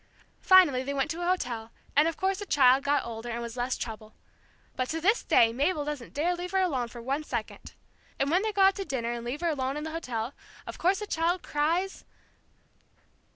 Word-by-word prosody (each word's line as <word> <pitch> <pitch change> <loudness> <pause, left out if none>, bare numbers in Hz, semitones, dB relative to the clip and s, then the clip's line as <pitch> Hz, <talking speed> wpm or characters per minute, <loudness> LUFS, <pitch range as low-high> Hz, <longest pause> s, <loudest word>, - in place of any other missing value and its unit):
Finally 355 -9 +6
they 280 +2 -4
went 270 -1 0
to 335 +2 -5
a 350 - -1
hotel, 240 -11 -1 0.3
and 295 +3 +5
of 330 - -2
course 385 0 0
the 410 - -5
child 265 -2 +5
got 285 +1 +1
older, 230 0 -6
and 235 0 -3
was 235 0 -6
less 250 +1 -1
trouble. 220 -2 -7 0.6
But 255 0 -2
to 325 - -2
this 410 +8 +3
day 225 -1 +4
Mabel 290 +4 0
doesn't 290 -5 -6
dare 330 +5 +1
leave 355 +1 -6
her 385 - +3
alone 275 -10 0
for 235 0 -10
one 275 +5 -1
second. - - -6 0.4
And 275 +2 0
when 360 +3 +3
they 435 +1 -1
go 400 -2 +2
out 385 0 +6
to 395 - -2
dinner, 240 -8 -3
and 240 -1 -4
leave 250 +6 -4
her 340 - +1
alone 270 -2 -2
in 300 - -4
the 315 - -5
hotel, 250 -6 -4 0.3
of - - -8
course 370 +3 +3
the - - -3
child 345 0 0
cries 335 +6 -1
290 Hz, 220 wpm, -28 LUFS, 245-350 Hz, 0.6 s, Finally